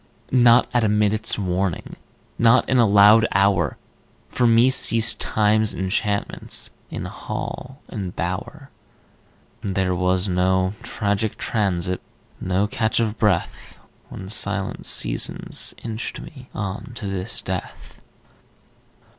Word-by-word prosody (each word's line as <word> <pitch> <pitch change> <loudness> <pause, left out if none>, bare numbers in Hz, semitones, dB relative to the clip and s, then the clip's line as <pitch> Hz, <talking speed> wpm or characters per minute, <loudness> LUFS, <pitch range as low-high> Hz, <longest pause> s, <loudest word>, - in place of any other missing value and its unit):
Not 120 -1 +5
at 120 -1 +2
a 110 - +2
minute's 105 +1 +2
warning, 95 -3 -2 0.4
Not 115 +1 +4
in 130 - +2
a 115 - +5
loud 105 +2 +6
hour, 100 -2 +2 0.5
For 125 - +1
me 115 +3 +4
ceased 115 -3 +4
Time's 110 0 +1
enchantments 100 +2 -1 0.2
In - - -6
hall 135 +3 -7
and 95 -4 -6
bower. 105 - -5 0.9
There 95 -2 -1
was 90 +2 0
no 95 +1 +1
tragic 105 -2 -2
transit, 90 -4 -1 0.4
No 95 +2 0
catch 110 +2 -1
of 110 -1 -2
breath, 105 -6 -1 0.3
When 95 - -9
silent 100 -1 -2
seasons - - +1
inched 115 0 -5
me 130 -3 -12
On 100 +4 -5
to 115 - -7
this 95 +3 -2
death 95 -1 -7
105 Hz, 115 wpm, -22 LUFS, 95-115 Hz, 0.9 s, loud